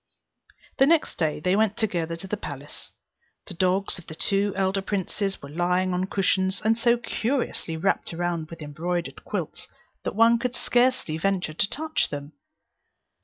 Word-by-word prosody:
The 270 - +7
next 325 0 +2
day 155 -3 +1
they 180 +5 +2
went 215 0 +2
together 170 -7 -1
to 165 +3 -8
the 210 - -1
palace. 145 -7 -8 0.5
The - - -9
dogs 185 +2 +1
of 170 - -15
the 155 - -7
two 200 +3 +1
elder 195 0 +1
princes 195 -1 -2
were 140 - -7
lying 180 +3 +1
on 180 +1 +1
cushions, 190 0 +1
and 220 +1 +3
so 235 +1 +3
curiously 235 - -2
wrapped 190 +5 0
around 170 -2 -2
with 165 -2 -8
embroidered 170 +4 -3
quilts, - - -4 0.3
that - - -3
one 230 +1 +6
would 250 0 -1
scarcely 245 -12 +2
venture 190 -3 0
to 195 +5 +2
touch 315 +1 0
them. 145 +1 -6
190 Hz, 165 wpm, -26 LUFS, 165-215 Hz, 0.5 s, The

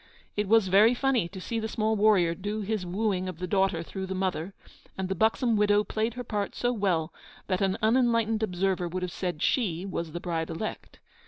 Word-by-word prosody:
It 210 -1 -1
was 220 -1 +4
very 210 +6 +5
funny 250 -8 +1
to 190 +2 -9
see 230 +5 -3
the 220 - -2
small 220 0 0
warrior 200 -5 +4
do 205 +4 -4
his 205 -2 -2
wooing 185 -1 -1
of 180 - -7
the 180 - -3
daughter 190 -2 +1
through 190 +2 -6
the 190 - -3
mother; 185 -1 -2 0.4
and 190 -1 -2
the - - +1
buxom 220 +4 +2
widow 210 0 +3
played 220 +2 -2
her 250 - -4
part 210 -4 -3
so 245 0 0
well 180 -7 0 0.3
that 185 0 -1
an 190 -1 +1
unenlightened 230 -1 +2
observer 185 -3 0
would 180 +2 -4
have 180 - -3
said 175 -5 -3
she 190 -8 0
was 170 -4 -4
the 175 - -5
bride 165 -2 -3
elect. 170 +6 -6
195 Hz, 210 wpm, -28 LUFS, 180-220 Hz, 0.4 s, very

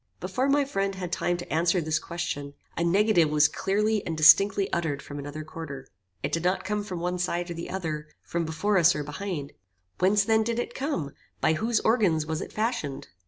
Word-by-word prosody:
Before 265 +1 -1
my 285 0 +3
friend 195 -6 -1
had 180 -2 -5
time 175 -1 0
to 175 - -6
answer 170 +3 +2
this 155 -1 0
question, 145 -4 -5 0.2
a 170 - 0
negative 180 -2 +4
was 150 0 +5
clearly 210 +6 0
and 165 -2 -4
distinctly 195 +5 +6
uttered 160 -5 -1
from 145 +1 -8
another 145 +2 -6
quarter. 150 -4 -8 0.4
It - - -1
did 165 - -1
not 180 +2 +1
come 210 +1 -1
from 185 -4 -5
one 180 +1 -2
side 175 0 -1
or - - -2
the 170 0 -6
other, 155 -5 -4 0.2
from 170 0 -2
before 175 +6 +1
us 175 0 +5
or 150 - -2
behind. 150 -1 -5 0.5
Whence 195 +2 +4
then 220 +1 +3
did 230 +1 -1
it 240 0 -3
come? 265 - -2 0.3
By 160 - +3
whose 225 +8 +1
organs 195 -10 +2
was 160 0 -3
it - - -7
fashioned? 215 - -2
175 Hz, 205 wpm, -27 LUFS, 155-205 Hz, 0.5 s, distinctly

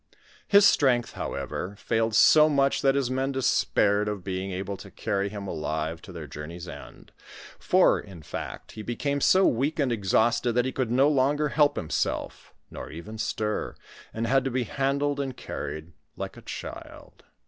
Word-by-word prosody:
His 200 0 +6
strength, 125 - +3
howe^,' 100 +3 -5
failed 115 0 0
so 155 +6 +7
much, 140 -2 +2
that 135 0 +3
his 135 -3 0
men 135 +1 0
despaired 105 -5 +2
of 105 -3 -3
being 95 0 -3
able 95 +2 -4
tcr - - -13
carry 100 0 -1
him 100 -1 -7
alive 80 0 -3
to 95 - -11
their 85 -3 -7
journey's 75 +5 -8
end; - - -11 0.5
for, - - +4
in 85 -5 -11
fact, - - -7
he 110 - -8
became 140 +6 -2
so 190 +6 +5
weak 140 +7 +1
and 140 -5 +1
exhausted, 115 +3 +2
that 125 +1 +2
he 130 - -1
could 130 -3 -2
no 130 +4 +4
longer 145 +1 +2
help 145 0 +3
himself, 80 - -3 0.2
nor - - -8
even 105 +8 -9
stir, 105 -1 -2 0.4
and 115 +1 -3
had 135 +2 +3
to 135 - -1
be 130 0 -1
handled 140 +4 -1
and 135 -3 -3
car - - -5
ried 80 +2 -7 0.2
like - - -6
a - - -12
child. - - -9
115 Hz, 175 wpm, -26 LUFS, 95-135 Hz, 0.5 s, so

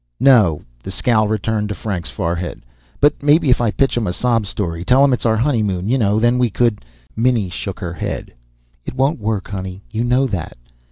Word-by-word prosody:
"No." 110 - +4 0.2
The - - -8
scowl 110 +2 +1
returned 105 0 -1
to 105 - -3
Frank's 95 -6 -4
forehead. 85 +1 -3 0.4
"But 145 +1 +3
maybe 145 0 +4
if 125 - +3
I 115 - +2
pitch 135 +5 +1
'em 120 -3 -1
a 90 - -1
sob 115 -1 0
story, 85 -4 -3
tell 130 +8 +4
'em 140 -2 +4
it's 120 - 0
our 110 0 +2
honeymoon, 105 -7 0
you 130 - +3
know, 105 -1 +2
then 120 +2 +2
we 125 -1 +2
could 115 0 0 0.2
" - - -34
Minnie 115 -4 +1
shook 95 +1 -5
her 90 -2 -4
head. 85 - -5 0.5
"It - - -7
won't 135 +3 +1
work, 105 -2 -2
honey. 95 -1 -6
You 110 +1 -1
know 125 +3 +2
that. 95 - -4
110 Hz, 210 wpm, -19 LUFS, 95-125 Hz, 0.5 s, No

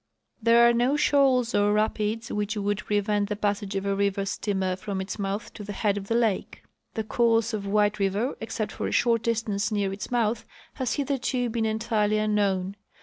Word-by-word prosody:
There 235 +1 +6
are 235 - +4
no 245 +5 +2
shoals 265 -5 +3
or 205 0 +3
rapids 215 +1 -1
which 210 +1 -2
would 205 0 -1
prevent 205 0 0
the 210 - -1
passage 205 -1 -2
of 195 0 -2
a 200 - +1
river 200 0 0
steamer 190 -2 -1
from 195 +1 -5
its 190 +2 -5
mouth 200 +2 -3
to 210 - -8
the 205 0 -6
head 200 0 0
of 200 -1 -5
the 230 - 0
lake. 225 -5 0 0.3
The 220 - -1
course 230 0 +2
of 200 -2 -3
White 210 +1 +2
river, 200 +6 0
except 220 -1 -3
for - - -4
a - - -3
short 230 -2 +2
distance 220 -2 -1
near 200 -2 0
its 195 - -6
mouth, 235 -2 0 0.3
has 260 -4 -2
hitherto 260 -3 -1
been 225 -1 0
entirely 215 -1 0
unknown. 200 -2 0
210 Hz, 195 wpm, -26 LUFS, 200-230 Hz, 0.3 s, There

